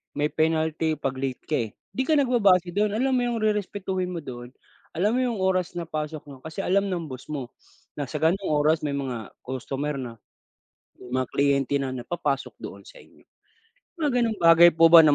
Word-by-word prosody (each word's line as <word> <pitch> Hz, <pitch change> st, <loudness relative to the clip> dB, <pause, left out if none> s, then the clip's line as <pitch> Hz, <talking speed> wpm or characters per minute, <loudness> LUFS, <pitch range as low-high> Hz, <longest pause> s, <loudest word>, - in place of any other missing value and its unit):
May 150 Hz, +1 st, 0 dB
penalty 160 Hz, 0 st, +1 dB
'pag 135 Hz, -2 st, -3 dB
late 130 Hz, -2 st, -3 dB
ka 155 Hz, -, -1 dB
eh, -, -, -19 dB, 0.2 s
'di 260 Hz, +7 st, -2 dB
ka 315 Hz, -, +4 dB
nagbabase 200 Hz, -, +3 dB
do'n, 205 Hz, +3 st, +1 dB
alam 265 Hz, +4 st, +1 dB
mo 255 Hz, -, +3 dB
yung 235 Hz, -2 st, -1 dB
rerespetuhin 195 Hz, -3 st, -1 dB
mo 175 Hz, -4 st, -5 dB
doon, 120 Hz, -2 st, -8 dB, 0.5 s
alam 200 Hz, +6 st, +2 dB
mo -, -, +2 dB
yung 245 Hz, -4 st, 0 dB
oras 185 Hz, -2 st, 0 dB
na 175 Hz, -, -2 dB
pasok 155 Hz, -1 st, -4 dB
mo, 140 Hz, -2 st, -11 dB
kasi 160 Hz, +7 st, -6 dB
alam 195 Hz, +2 st, +2 dB
ng 175 Hz, -3 st, -2 dB
boss 130 Hz, 0 st, -9 dB
mo, 135 Hz, -5 st, -5 dB, 0.5 s
na 145 Hz, -, -2 dB
sa 150 Hz, -, -9 dB
gano'ng 180 Hz, +5 st, +2 dB
oras 150 Hz, +1 st, +3 dB
may 145 Hz, -2 st, -2 dB
mga 125 Hz, -6 st, -4 dB
customer 135 Hz, +3 st, -3 dB
na. 125 Hz, -3 st, -6 dB, 0.8 s
May 125 Hz, -, -12 dB
mga 130 Hz, -, -3 dB
kliyente 140 Hz, -1 st, +1 dB
na, 135 Hz, -2 st, -3 dB
na 125 Hz, -, -5 dB
papasok 145 Hz, -6 st, -2 dB
doon -, -, -9 dB
sa -, -, -14 dB
inyo. -, -, -18 dB, 0.8 s
Mga 310 Hz, -4 st, 0 dB
gano'ng 225 Hz, -2 st, 0 dB
bagay 165 Hz, 0 st, +8 dB
po 165 Hz, 0 st, +6 dB
ba, 170 Hz, -, +12 dB
na 155 Hz, -2 st, +6 dB
160 Hz, 200 wpm, -25 LUFS, 140-195 Hz, 0.8 s, ba